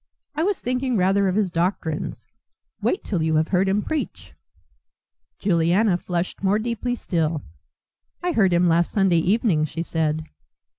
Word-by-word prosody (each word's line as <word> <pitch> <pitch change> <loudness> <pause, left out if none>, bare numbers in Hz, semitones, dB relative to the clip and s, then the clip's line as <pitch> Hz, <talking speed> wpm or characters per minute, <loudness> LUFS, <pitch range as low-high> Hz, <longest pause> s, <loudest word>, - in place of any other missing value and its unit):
"I 305 - -2
was 390 +3 0
thinking 250 0 -1
rather 195 +1 +3
of 185 - 0
his 205 -4 +1
doctrines. 165 -2 -2 0.5
Wait 380 - 0
till 185 -6 -2
you 160 0 +1
have 155 +1 +2
heard 190 +1 +2
him 205 +2 +1
preach." 315 -2 -4 1.0
Juliana 180 +2 +2
flushed 175 0 -3
more 195 +1 +2
deeply 235 +2 -2
still. 160 - -1 0.8
"I 355 - +1
heard 195 - +3
him 175 +1 +3
last 170 0 +2
Sunday 190 -5 +3
evening," 190 -2 +2
she 165 +2 -4
said. 160 -2 -1
185 Hz, 150 wpm, -23 LUFS, 165-215 Hz, 1.0 s, rather